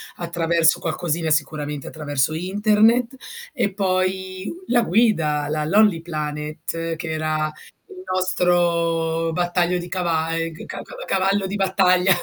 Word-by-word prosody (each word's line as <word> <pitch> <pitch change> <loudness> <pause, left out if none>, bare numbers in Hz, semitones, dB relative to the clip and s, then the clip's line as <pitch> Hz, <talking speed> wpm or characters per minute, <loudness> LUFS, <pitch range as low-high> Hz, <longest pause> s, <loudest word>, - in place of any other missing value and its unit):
attraverso 170 -1 +1
qualcosina, 165 0 -2
sicuramente 150 -2 -1
attraverso 145 -1 -1
internet 210 +8 +2 0.4
e 200 - 0
poi 185 0 -1 0.2
la 245 -1 +3
guida, 165 -9 +2
la 155 0 -1
Lonely 200 0 +4
Planet, 155 +1 -4
che 160 +1 -6
era 155 0 -1 0.4
il 375 -2 -10
nostro 170 -3 +1
battaglio 175 +1 +1
di 175 - -5
cava 165 -3 -1
ehm, 165 0 -2
g 160 - -10
ca - - -7
cava - - -10
cavallo 195 +1 +1
di 195 - -4
battaglia, 190 -1 +3
170 Hz, 130 wpm, -22 LUFS, 160-190 Hz, 0.4 s, Lonely